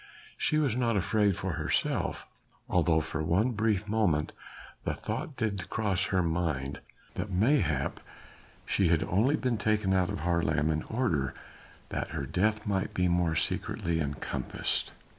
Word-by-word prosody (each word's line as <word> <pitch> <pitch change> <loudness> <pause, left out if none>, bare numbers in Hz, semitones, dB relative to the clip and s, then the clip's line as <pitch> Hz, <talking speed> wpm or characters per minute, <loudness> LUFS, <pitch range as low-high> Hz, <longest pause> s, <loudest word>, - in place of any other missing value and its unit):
She 155 - +1
was 140 -7 +2
not 120 -3 +1
afraid 100 +1 +2
for - - -2
herself, - - -1 0.4
although 85 -2 +3
for 80 0 -4
one 90 +10 +2
brief 105 -2 0
moment 100 -9 +1 0.5
the - - -1
thought 145 - -4
did 100 -6 -2
cross 100 -4 +1
her 95 -2 +1
mind 80 -5 -1 0.3
that 105 - -4
mayhap 90 - +1 0.7
she 95 - +2
had 80 -1 +3
only 115 +11 +2
been 125 -6 -1
taken 105 -3 +1
out 95 -2 +2
of - - -3
Haarlem 80 -3 +1
in 80 0 0
order 90 - 0 0.5
that - - -2
her 70 - -2
death 105 +8 0
might 100 -2 -1
be 90 0 +2
more 85 -2 +2
secretly 85 +1 -1
encompassed. 70 -2 -2
95 Hz, 145 wpm, -30 LUFS, 80-110 Hz, 0.7 s, although